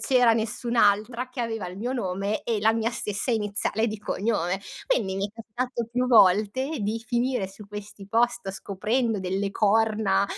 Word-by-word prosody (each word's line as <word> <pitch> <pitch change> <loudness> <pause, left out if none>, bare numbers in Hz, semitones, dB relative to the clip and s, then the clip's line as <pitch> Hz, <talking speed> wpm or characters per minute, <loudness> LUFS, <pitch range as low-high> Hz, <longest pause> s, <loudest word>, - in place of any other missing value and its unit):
c’era 250 -4 +4
nessun’altra 230 +1 +1
che 255 0 -6
aveva 225 -4 -2
il 180 +1 -8
mio 240 +6 -2
nome 200 -2 -2
e 225 -3 0
la 220 +1 +4
mia 225 0 0
stessa 225 0 -2
iniziale 215 +1 0
di 215 -1 -5
cognome. 195 -3 -1 0.3
Quindi 195 - 0
mi 195 +1 0
è 205 - -15
capitato 235 +1 -4
più 250 +1 0
volte 220 +6 +4
di 220 +3 -2
finire 245 -4 0
su 200 +2 -13
questi 205 -1 -9
post, 235 -1 +1
scoprendo 215 +4 -1
delle 190 +2 -1
corna, 210 -1 +2
220 Hz, 160 wpm, -26 LUFS, 200-235 Hz, 0.3 s, c’era